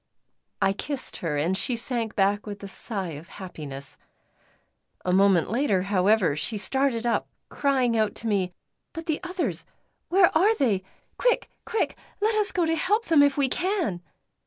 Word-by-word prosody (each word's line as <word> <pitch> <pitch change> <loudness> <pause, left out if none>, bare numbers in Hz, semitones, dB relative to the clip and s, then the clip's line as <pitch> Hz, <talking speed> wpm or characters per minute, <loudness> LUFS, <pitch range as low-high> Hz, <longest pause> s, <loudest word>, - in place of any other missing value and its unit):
I 195 0 +3
kissed 275 +6 -5
her, 150 -4 -2
and 165 +6 +1
she 240 +5 -1
sank 230 -2 -2
back 205 +2 +1
with 205 -1 -7
a - - -5
sigh 195 -2 -4
of 155 +3 -9
happiness. 150 -9 -9 1.1
A 180 - +1
moment 190 -2 +4
later, 225 -7 +2
however, 195 -4 +3
she 210 +8 -1
started 240 +3 +1
up, 235 - +1 0.2
crying 260 -4 +1
out 215 -2 +1
to 230 - -4
me: 195 -4 +1 0.4
"But 330 -1 -6
the 315 -3 -1
others, 360 -1 -2 0.5
where 365 -2 +5
are 405 +8 +5
they? 225 - +1 0.4
Quick! - - +1 0.2
quick! 450 - 0 0.2
let 430 +2 +2
us 425 -1 +2
go 350 -2 +1
to 325 0 +1
help 415 +8 +1
them 320 -3 +5
if 285 -1 +4
we 280 -2 +3
can!" 350 - -1
225 Hz, 165 wpm, -26 LUFS, 190-315 Hz, 1.1 s, where